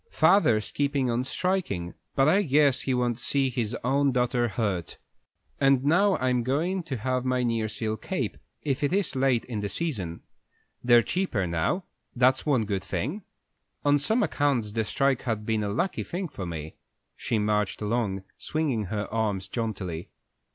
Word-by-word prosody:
"Father's 120 - +3
keepin' 140 -3 0
on 120 +2 0
strikin', 130 - -1 0.2
but 135 +1 +4
I 190 +6 +5
guess 145 -5 +3
he 130 - -1
won't 120 -1 0
see 135 +1 +1
his 120 -2 -2
own 140 +2 +2
daughter 125 -1 +1
hurt; 100 -7 -2 0.6
and 135 -2 +4
now 190 +6 +4
I'm 125 -1 +1
goin' 160 +10 0
to 135 -6 -3
have 125 +3 -1
my 130 -1 +1
nearseal 110 -1 -1
cape, - - -3 0.3
if 140 -1 -1
it 145 - +1
is 195 -7 0
late 130 -3 +2
in 115 -4 -4
the 100 0 -2
season. 100 - -3 0.6
They're 120 -1 +6
cheaper 180 - -1
now, 85 - 0 0.3
that's 130 +3 +3
one 130 -7 +3
good 100 -3 -2
thing. 110 - -3 0.6
On 145 0 +4
some 220 - +2
accounts 140 - +1
the 110 +1 -1
strike 135 +2 +1
has 115 -3 -1
been 105 0 -1
a 100 - -1
lucky 175 - -1
thing 180 0 -4
for 95 -9 -6
me." 80 -2 -6 0.4
She 115 - -1
marched 105 -1 0
along, 105 -3 -1 0.2
swinging 140 -9 -1
her 105 +2 -3
arms 105 -4 -1
jauntily. 95 -6 -4
125 Hz, 165 wpm, -27 LUFS, 105-140 Hz, 0.6 s, They're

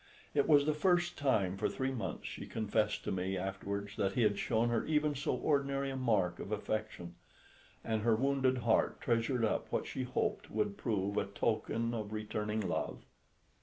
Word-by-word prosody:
It 140 -1 +3
was 145 -2 +6
the 155 - +2
first 175 +2 +2
time 100 -10 +1
for - - 0
three 130 0 -1
months, 125 -4 -4
she - - -7
confessed 110 -1 0
to - - -2
me 95 +1 -1
afterwards, 100 +2 -4
that 100 -1 +1
he 125 - +2
had 105 -2 +2
shown 115 +1 +1
her 115 -1 +1
even 150 -1 +2
so 140 0 -1
ordinary 140 -2 0
a - - -4
mark 105 -9 +1
of 100 - -6
affection; 105 -4 -3 0.7
and 110 -1 -1
her 115 0 +4
wounded 130 +1 +2
heart 115 -2 +2
treasured 115 -1 +1
up 110 - -1
what - - 0
she - - -4
hoped 125 0 -1
would 105 -2 -1
prove 100 -3 -1
a - - +2
token 115 +3 -1
of 110 -2 -4
returning 105 0 -2
love. 95 - -3
110 Hz, 180 wpm, -34 LUFS, 105-135 Hz, 0.7 s, was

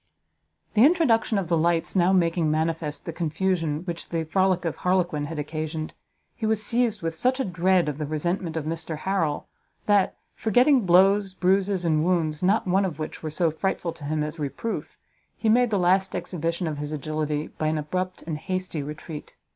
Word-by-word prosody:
The 220 - +5
introduction 265 - +4
of 195 -3 -1
the 170 - +2
lights 165 +2 +1
now 180 0 +4
making 170 -3 +2
manifest 155 -1 -1
the 165 - -4
confusion 165 -1 -1
which 170 -2 -5
the 165 -1 -1
frolic 185 +2 +1
of 160 -2 -2
Harlequin 175 -5 0
had 160 +2 -6
occasioned, 155 +1 -4 0.4
he 220 - -2
was 215 -1 +2
seized 230 -2 +1
with 165 0 -1
such 255 +10 0
a 265 - 0
dread 180 -1 +2
of 150 0 -3
the 150 - -2
resentment 165 +2 -2
of 155 - -3
Mr 160 0 -4
Harrel, 165 -4 -1 0.4
that, 205 -2 +3 0.2
forgetting 245 +1 +3
blows, 195 +2 +4
bruises, 190 0 +1
and 155 -2 +2
wounds, 160 -4 0
not 195 +4 +2
one 190 +2 +2
of 175 -7 -3
which 155 - -6
were 155 - -4
so 165 +2 +1
frightful 170 0 -2
to 145 - -9
him 150 +1 -1
as 150 +2 -5
reproof, 150 +10 -4 0.4
he 225 - 0
made 245 +2 +4
the 210 - +1
last 190 +1 +2
exhibition 170 0 -2
of 155 -3 -3
his 150 0 -4
agility 155 0 -2
by 155 - +1
an 155 0 0
abrupt 185 +5 -3
and 155 -2 -4
hasty 185 -3 -3
retreat. 150 +1 -8
170 Hz, 185 wpm, -25 LUFS, 155-190 Hz, 0.4 s, The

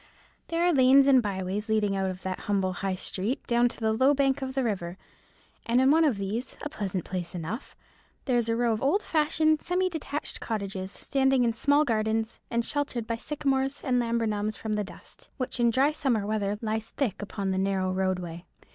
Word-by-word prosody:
There 335 +1 0
are 350 0 +4
lanes 270 0 +6
and 270 -2 +6
byways 200 +1 -3
leading 210 -2 +2
out 190 -1 0
of 185 0 -7
that 185 -1 -3
humble 190 -2 +1
High 190 0 -2
Street 200 +7 -3
down 240 0 +3
to - - -10
the 220 -1 +1
low 260 +5 +4
bank 275 0 +2
of 265 0 -4
the 270 - +1
river; 185 -6 -2 0.7
and 235 +2 +3
in 265 +1 +5
one 325 +2 +5
of 280 -9 +2
these, 210 +6 -4
a 295 - -3
pleasant 195 - -3
place 180 -2 -4
enough, 180 - -5 0.5
there 250 -3 +2
is 230 -1 -1
a 230 - +2
row 235 -1 +2
of 220 - -3
old 355 +10 +2
fashioned 310 0 +2
semi 365 +1 +1
detached 300 -2 -4
cottages, 195 -3 -4
standing 265 +1 +1
in 230 -1 +2
small 285 +6 +3
gardens, 220 -1 -1
and 235 0 0
sheltered 280 -6 -2
by 230 0 -2
sycamores 270 0 -1
and 250 -2 +2
laburnums 220 -3 -1
from 220 -1 -3
the 210 0 0
dust, 200 - -13
which 255 -1 -3
in 235 0 +4
dry 265 +5 +3
summer 260 -9 0
weather 205 -1 -1
lies 220 0 -2
thick 220 -9 -2
upon 200 -1 -3
the 190 - 0
narrow 190 -1 0
roadway. 180 -3 -2
230 Hz, 200 wpm, -27 LUFS, 200-270 Hz, 0.7 s, lanes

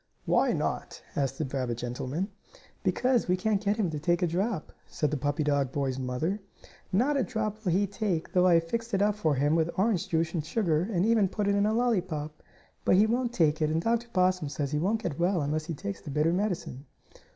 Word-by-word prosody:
"Why, - - +3
not?" - - -2 0.2
asked 135 -2 -1
the 155 - -1
rabbit 130 -3 -2
gentleman. 130 - -3 0.5
"Because 250 -2 +1
we 180 +1 +2
can't 205 +1 0
get 205 +1 +1
him 195 -7 0
to 150 - -3
take 175 +4 +1
a - - +3
drop," 185 +1 -2
said 150 -2 -1
the - - 0
puppy 145 +3 -1
dog 140 -3 +1
boy's 135 -2 -1
mother. 135 +11 -2 0.5
"Not 260 +9 +2
a 265 - +2
drop 215 -1 -3
will 180 - +1
he 195 +4 +3
take, 195 -5 -2
though 180 -1 +4
I 175 - +6
have 165 - +4
fixed 230 +3 -2
it 195 - +2
up 210 0 +3
for 160 -8 0
him 145 +3 +2
with 165 0 +2
orange 195 -2 +1
juice 160 0 0
and 165 -4 -1
sugar 170 0 0
and 180 -1 +1
even 220 -4 +3
put 205 +1 -2
it 200 - +3
in 200 +1 +2
a 215 - +1
lollypop. 180 -11 -1 0.4
But - - +4
he 200 +3 +6
won't 240 +2 0
take 160 -7 +2
it, 155 - +2
and 160 +1 +1
Dr. 230 +5 0
Possum 185 -5 +2
says 140 -1 -3
he 150 - 0
won't 215 +7 0
get 155 -3 -3
well 175 +1 +2
unless 155 +1 -1
he 165 - -4
takes 100 -7 -5
the - - -9
bitter 150 +4 +2
medicine." 180 -8 -2
175 Hz, 230 wpm, -28 LUFS, 150-210 Hz, 0.5 s, I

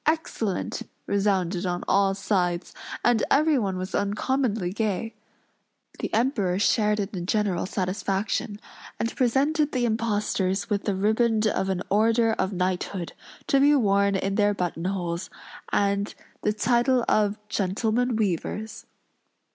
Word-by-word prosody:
Excellent!" 270 - -1 0.2
resounded 190 -3 0
on 180 -1 -2
all 195 -1 +3
sides; 180 -3 -1 0.3
and 240 -2 +3
everyone 275 -11 +2
was 185 +1 -5
uncommonly 210 -1 0
gay. 220 +1 -2 0.9
The - - -3
Emperor 220 -7 +1
shared 210 +1 +2
in 200 -1 -1
the 180 - -3
general 190 -1 0
satisfaction; 195 +2 -2 0.4
and 230 - -2
presented 285 +5 +1
the 250 -2 +1
impostors 210 -3 -1
with 200 -1 0
the 200 - 0
riband 220 +2 +2
of 195 -2 0
an 185 -2 -1
order 225 +2 +3
of 190 -2 -1
knighthood, 180 -1 -2 0.3
to 275 - +3
be 290 +2 +5
worn 200 -5 +3
in 195 +1 -1
their 205 0 +2
button 175 -2 -3
holes, 175 -2 -2 0.4
and 200 0 0 0.3
the 210 - +1
title 240 +3 +2
of 210 -1 +2
"Gentlemen 220 +5 0
Weavers." 215 +1 -2
205 Hz, 130 wpm, -25 LUFS, 190-230 Hz, 0.9 s, be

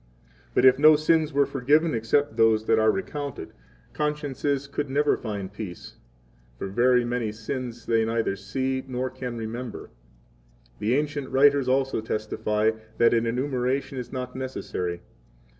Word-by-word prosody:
But - - +4
if 130 +1 +6
no 155 +1 +8
sins 155 0 +2
were 140 0 +3
forgiven, 145 +5 +2
except 115 +3 +1
those 110 -1 +3
that 110 0 +3
are 110 0 +4
recounted, 145 - -3
9 - - -25 0.4
consciences 145 -2 -1
could 145 0 -4
never 145 +2 +2
find 100 -4 -5
peace; 100 -4 -8 0.6
for - - -5
very 120 +5 +3
many 120 -2 -1
sins 120 +2 -6
they 115 -1 +2
neither 115 -2 0
see 130 +7 -2
10 135 - -15
nor 130 0 -2
can 125 -3 -6
remember. 115 +1 -6 0.9
The 115 +4 +1
ancient 145 -2 -2
writers 140 0 +4
also 135 -2 +1
testify 110 0 0 0.3
that 115 0 +5
an 115 0 +2
enumeration 130 +2 -1
is 125 - -7
not 125 -1 -5
necessary. 90 -9 -4
125 Hz, 150 wpm, -25 LUFS, 115-140 Hz, 0.9 s, no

